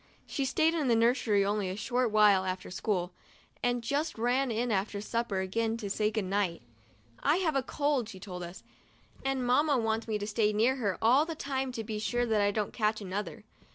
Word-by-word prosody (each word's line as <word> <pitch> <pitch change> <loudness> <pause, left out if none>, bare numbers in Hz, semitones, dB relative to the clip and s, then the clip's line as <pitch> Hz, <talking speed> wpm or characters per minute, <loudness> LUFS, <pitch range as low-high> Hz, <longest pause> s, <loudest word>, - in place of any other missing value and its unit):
She 275 - -2
stayed 315 +4 +2
in 310 -5 0
the 235 - +4
nursery 225 -3 +3
only 205 -1 0
a 185 - -3
short 240 +3 0
22 215 - -1
MONDAY— - - +7
MY - - +9
FIRST - - -3
BATH - - -6
while 185 - 0
after 185 - -8
school, 185 -2 -1 0.5
and 245 -1 0
just 290 +5 -1
ran 250 +4 +1
in 235 +1 -1
after 200 0 -1
supper 215 -2 -2
again 225 +4 -1
to 205 -4 -5
sa 210 - 0
Y> - - +4
"good 215 -1 -2
night." 185 -6 -1 0.6
"I've 315 +2 +2
a 270 - +3
cold," 280 -3 -1
she 190 -4 -9
told 185 -2 -7
us, 175 +1 -8 0.6
"and 270 -1 -1
Mamma 285 +3 +3
wants 225 -1 -1
me 215 -1 0
to 205 - -4
stay 210 0 +1
near 235 +6 +2
her 205 -7 -1
all 255 +6 +5
the 330 - -4
time 270 -3 -2
to 225 - -4
be 215 -1 -4
sure 240 +3 0
that 220 -3 +2
I 205 - +3
don't 205 0 -2
catch 215 -1 0
another." 200 +1 -5
225 Hz, 230 wpm, -30 LUFS, 205-255 Hz, 0.6 s, MY